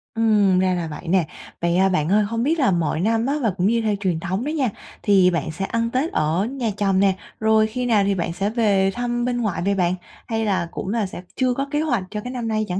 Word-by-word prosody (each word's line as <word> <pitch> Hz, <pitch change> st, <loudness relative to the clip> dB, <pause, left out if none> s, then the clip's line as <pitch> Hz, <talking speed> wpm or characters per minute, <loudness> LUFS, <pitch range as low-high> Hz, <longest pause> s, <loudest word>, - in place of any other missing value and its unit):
Ừm, 210 Hz, -4 st, +3 dB
ra 185 Hz, 0 st, +2 dB
là 175 Hz, -2 st, -2 dB
vậy 155 Hz, +3 st, -8 dB
nè. 175 Hz, -2 st, +2 dB, 0.3 s
Vậy, 170 Hz, 0 st, +1 dB
à, 190 Hz, +1 st, +4 dB
bạn 170 Hz, -4 st, 0 dB
ơi 210 Hz, +1 st, +4 dB
hông 230 Hz, +3 st, -2 dB
biết 320 Hz, +5 st, +1 dB
là 260 Hz, -8 st, +3 dB
mọi 165 Hz, -3 st, 0 dB
năm 225 Hz, +3 st, +1 dB
á 275 Hz, -, 0 dB
và 225 Hz, -, +2 dB
cũng 180 Hz, +1 st, +2 dB
như 230 Hz, +2 st, +2 dB
theo 215 Hz, -2 st, 0 dB
truyền 185 Hz, -5 st, -1 dB
thống 190 Hz, +5 st, -2 dB
đó -, -, -1 dB
nha, 290 Hz, -6 st, 0 dB, 0.3 s
thì 190 Hz, -3 st, +5 dB
bạn 165 Hz, -2 st, -2 dB
sẽ 195 Hz, +5 st, -3 dB
ăn 230 Hz, +2 st, -1 dB
Tết 270 Hz, +7 st, 0 dB
ở 160 Hz, +6 st, +1 dB
nhà 245 Hz, -2 st, -2 dB
chồng 195 Hz, -2 st, +2 dB
nè, 195 Hz, -1 st, +3 dB, 0.2 s
rồi 220 Hz, 0 st, +3 dB
khi 250 Hz, +3 st, -3 dB
nào 220 Hz, -4 st, +3 dB
thì 200 Hz, 0 st, +1 dB
bạn 170 Hz, -2 st, -2 dB
sẽ 200 Hz, +3 st, -1 dB
về 205 Hz, -4 st, +2 dB
thăm 240 Hz, 0 st, -2 dB
bên 245 Hz, -1 st, -1 dB
ngoại 210 Hz, -7 st, -1 dB
vậy 200 Hz, 0 st, +2 dB
bạn, 180 Hz, -1 st, +1 dB, 0.3 s
hay 225 Hz, -1 st, -1 dB
là 185 Hz, -5 st, 0 dB
cũng -, -, -5 dB
là 220 Hz, 0 st, 0 dB
sẽ 185 Hz, -, -7 dB
chưa 255 Hz, -1 st, +1 dB
có 275 Hz, +3 st, -2 dB
kế 295 Hz, -, +1 dB
hoạch 245 Hz, -11 st, 0 dB
cho 210 Hz, -, -4 dB
cái 245 Hz, -, -6 dB
năm 245 Hz, -3 st, -4 dB
nay 215 Hz, -1 st, 0 dB
chẳng 180 Hz, +1 st, -2 dB
210 Hz, 270 wpm, -22 LUFS, 185-235 Hz, 0.3 s, thì